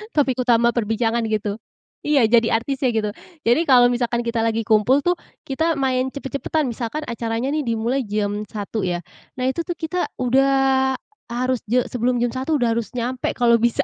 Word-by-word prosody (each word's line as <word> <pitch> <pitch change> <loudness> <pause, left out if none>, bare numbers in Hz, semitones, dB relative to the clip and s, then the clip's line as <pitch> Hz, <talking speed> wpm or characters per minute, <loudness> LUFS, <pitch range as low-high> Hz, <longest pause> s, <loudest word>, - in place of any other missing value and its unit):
Topik 270 -4 +2
utama 235 -1 +3
perbincangan 225 0 0
gitu. 210 -1 -2 0.5
Iya, 275 -7 +3
jadi 230 -1 +4
artisnya 270 -1 -1
gitu. 215 -1 0 0.3
Jadi 240 +8 +3
kalau 245 -2 +6
misalkan 240 -1 0
kita 235 -1 -1
lagi 225 0 0
kumpul 220 +7 +3
tuh 355 0 +1 0.3
kita 320 +5 0
main 260 -1 0
cepet-cepetan, 280 +1 -2
misalkan 235 +5 -4
acaranya 235 0 -2
nih 300 -3 -1
dimulai 230 +3 -1
jam 205 0 -2
1.00 210 -1 -4
ya, 175 -1 -1 0.3
nah 255 - -4
itu 335 +5 -2
tuh 350 - -2
kita 330 +3 -2 0.2
udah 265 +1 +3 0.3
harus 250 +1 -1
je 245 +2 +2
sebelum 245 0 0
jam 240 - 0
1.00 265 +4 -1
udah 240 -4 +2
harus 225 -1 -4
nyampe, 250 +1 -2
kalau 235 -1 +4
bisa, 235 0 +2
245 Hz, 175 wpm, -21 LUFS, 230-270 Hz, 0.5 s, kalau